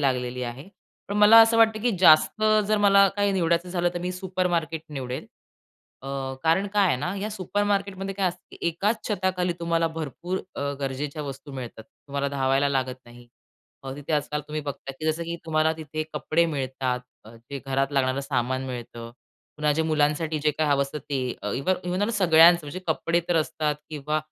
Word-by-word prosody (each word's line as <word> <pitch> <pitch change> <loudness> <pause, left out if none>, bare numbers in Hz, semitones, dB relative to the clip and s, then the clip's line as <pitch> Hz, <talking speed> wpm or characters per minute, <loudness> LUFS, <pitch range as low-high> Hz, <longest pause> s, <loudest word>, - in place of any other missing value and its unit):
लागलेली 125 -2 -1
आहे. 125 +7 -6 0.4
पण 200 - -2
मला 210 +2 +8
असं 225 0 +5
वाटतं, 220 -1 +4
की 245 - +3
जास्त 175 +5 +5 0.3
जर 215 - +3
मला 200 -1 +6
काही 205 0 +2
निवडायचं 170 -1 +1
झालं 175 -1 0
तर - - -1
मी 180 +1 -3
सुपरमार्केट 180 -4 -2
निवडेल. 130 -1 -5 0.8
अ, 135 - -7 0.3
कारण 165 +5 +2
काय 205 -1 +4
आहे 125 - +2
ना, 175 +8 -3
या 210 +2 -3
सुपरमार्केटमध्ये 200 -1 -2
काय 190 -2 +1
असतं 180 +1 -9
की - - -12
एकाच 205 +7 -1
छताखाली 185 -3 0
तुम्हाला 165 -1 +1
भरपूर 175 +5 -4 0.2
अ, 140 0 -2
गरजेच्या 140 +2 -3
वस्तू 140 0 -8
मिळतात. 125 -4 -7
तुम्हाला 140 +2 -5
धावायला 135 0 +1
लागत 130 -2 -2
नाही. 120 0 -15 0.6
मग 135 0 -6
तिथे 145 +2 -5
आजकाल 150 0 0
तुम्ही 155 0 -3
बघता 140 -1 -6
जसं 155 +2 0
की 170 0 -4
तुम्हाला 160 0 +2
तिथे 155 0 -4
कपडे 155 +3 +1
मिळतात. 130 -4 -2 0.2
अ, 110 +2 -13
जे 125 +5 -8
घरात 135 +1 0
लागणारं 135 -1 +1
सामान 130 -1 -1
मिळतं. 120 -2 -7 0.5
पुन्हा 150 0 +1
जे 160 - +1
मुलांसाठी 155 0 +1
जे 150 - +3
काही 150 +1 -1
हवं 140 -1 +3
असतं 140 +2 -5
ते 140 0 -4 0.4
इव्ह 160 +8 +1
इव्हन 180 +3 -1
व 210 - +1
सगळ्यांचं 170 -4 +6
म्हणजे 155 +6 -6
कपडे 165 +1 +1
तर 175 - +2
असतात 155 -1 0 0.2
किंवा 150 0 -2
155 Hz, 180 wpm, -25 LUFS, 135-180 Hz, 0.8 s, मला